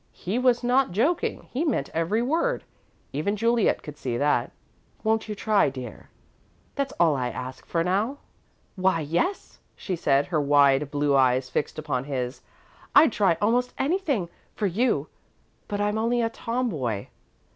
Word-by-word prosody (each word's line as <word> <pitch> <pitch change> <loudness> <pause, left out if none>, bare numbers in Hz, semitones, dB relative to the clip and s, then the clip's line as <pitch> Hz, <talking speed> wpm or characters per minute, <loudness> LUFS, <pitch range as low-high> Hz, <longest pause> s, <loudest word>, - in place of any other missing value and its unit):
He 200 +7 -3
was 250 -1 +3
not 255 +2 +3
joking 275 - 0
he 270 +6 -1
meant 285 - -1
every 170 +8 0
word. 330 - 0 0.5
Even 155 +9 -1
Juliet 230 +1 +2
could 150 -2 -9
see 120 -2 -2
that. 145 -3 +1 0.5
"Won't 220 0 0
you 210 - -3
try, 210 -5 +2
dear? 130 -4 -9 0.6
That's 275 -1 -2
all 165 -4 +4
I'll 125 -2 -2
ask 130 0 -7
for, 165 -1 0
now." 205 +10 0 0.6
"Why, 185 -3 +2
yes," 170 - -2 0.2
she 185 - -4
said, 140 -4 +2
her 155 -4 0
wide 140 0 +4
blue 145 0 +1
eyes 130 -1 +3
fixed - - -2
upon 145 -4 -2
his. 130 -2 -3 0.5
"I'd 320 - +7
try 195 -6 +2
almost 245 +4 +1
anything 285 - 0 0.3
for 210 - -1
you, 215 +7 +1 0.6
but 205 - -3
I'm 210 +1 0
only 235 +1 +1
a 225 - 0
tomboy." 160 - -2
190 Hz, 155 wpm, -25 LUFS, 140-235 Hz, 0.6 s, I'd